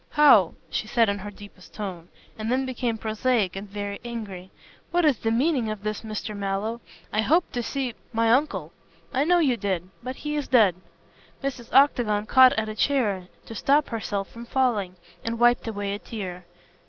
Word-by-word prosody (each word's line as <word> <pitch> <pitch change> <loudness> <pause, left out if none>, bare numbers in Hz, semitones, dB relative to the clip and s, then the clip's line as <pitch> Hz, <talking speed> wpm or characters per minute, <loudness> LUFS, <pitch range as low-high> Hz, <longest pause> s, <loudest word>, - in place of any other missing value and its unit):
"How 275 - +6
" 170 - -34
she 215 - -2
said 230 -1 +3
in 200 0 -1
her 205 +2 -6
deepest 205 -3 -14
tone, 185 -5 -6 0.3
and 220 +1 -3
then 260 +1 +1
became 245 -3 -2
prosaic 220 -2 0
and 195 +1 -6
very 200 0 -5
angry. 210 -6 -6 0.4
"What 350 -1 +2
is 280 -7 +3
the 225 - 0
meaning 250 0 +1
of 215 -1 -5
this, 215 0 -3
Mr. 215 -1 -5
Mallow? 200 +4 -2 0.3
I 215 - +2
hoped 330 +10 +2
to 245 - -1
see 255 +1 -3
" - - -35
"My 225 0 +2
uncle. 195 - 0 0.4
I 270 +3 +2
know 355 +2 +4
you 275 -8 +2
did. 190 -4 -2
But 255 +2 -5
he 300 +2 -4
is 295 -2 -2
dead." 220 -8 +5 0.7
Mrs. 255 -4 -4
Octagon 235 -7 +4
caught 260 +3 +7
at 220 -1 -1
a 215 - -4
chair 215 -7 0 0.2
to - - -9
stop 285 +6 +2
herself 205 -4 -3
from 235 0 -10
falling, 230 -9 0 0.3
and 230 0 -2
wiped 240 0 +3
away 205 -2 -3
a 205 - -4
tear. 185 -6 -7
225 Hz, 190 wpm, -25 LUFS, 200-255 Hz, 0.7 s, caught